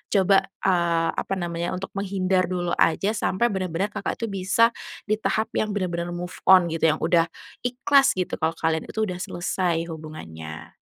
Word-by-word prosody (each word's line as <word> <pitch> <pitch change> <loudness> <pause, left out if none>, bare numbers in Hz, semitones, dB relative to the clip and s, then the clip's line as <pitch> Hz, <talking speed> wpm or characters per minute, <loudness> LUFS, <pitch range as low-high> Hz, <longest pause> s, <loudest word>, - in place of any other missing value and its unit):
coba, 195 0 +5 0.3
eee, 170 -3 +2
apa - - -3
namanya 170 0 -2
untuk 185 +1 -6
menghindar 190 -2 +1
dulu 175 -1 -1
aja 195 +5 +3
sampai 230 +3 +1
benar-benar 185 +1 -2
Kakak 205 -1 -3
itu 230 - -1
bisa 195 +5 +3 0.4
di 215 - +2
tahap 220 0 0
yang 215 -1 0
benar-benar 175 -3 -2
move 175 +1 -6
on 180 -3 +7
gitu, 165 0 +2
yang 155 - -4
udah 170 -1 +3 0.4
ikhlas 270 +3 +3
gitu, 185 - -1
kalau 160 0 +1
kalian 160 0 0
itu 220 - -2
udah 180 -3 -5
selesai 175 -2 -1
hubungannya. 80 - -9
180 Hz, 165 wpm, -24 LUFS, 170-195 Hz, 0.4 s, on